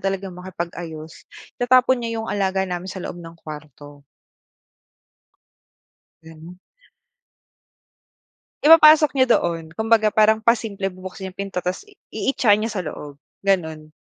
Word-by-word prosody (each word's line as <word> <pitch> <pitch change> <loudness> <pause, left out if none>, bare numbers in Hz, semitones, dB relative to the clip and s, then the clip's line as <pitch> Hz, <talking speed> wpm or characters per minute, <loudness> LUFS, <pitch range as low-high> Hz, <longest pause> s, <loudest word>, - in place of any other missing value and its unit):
talagang 195 -1 -3
makipag-ayos, 170 -3 -8 0.3
itatapon 255 +1 +3
niya 230 -1 -4
yung - - -5
alaga 190 -1 0
namin 180 0 -5
sa 190 -1 -7
loob 175 - -7
ng 165 0 -12
kuwarto. 150 -2 -11 2.2
Ganun. 160 +2 -13 2.1
Ipapasok 310 -1 +7
niya 260 -3 +3
doon. 165 -2 -3
Kumbaga 220 -1 +3
parang 215 +1 +3
pasimple 220 -4 0
bubuksan 185 0 -9
yung 185 - -14
pinto 195 -2 -4
ta's 180 - -4
i 415 - -21 0.2
iitya 235 -6 +2
niya 220 +1 -3
sa 205 - -3
loob, 145 -2 -9 0.2
ganon. 160 -6 -1
190 Hz, 120 wpm, -21 LUFS, 165-220 Hz, 2.2 s, Ipapasok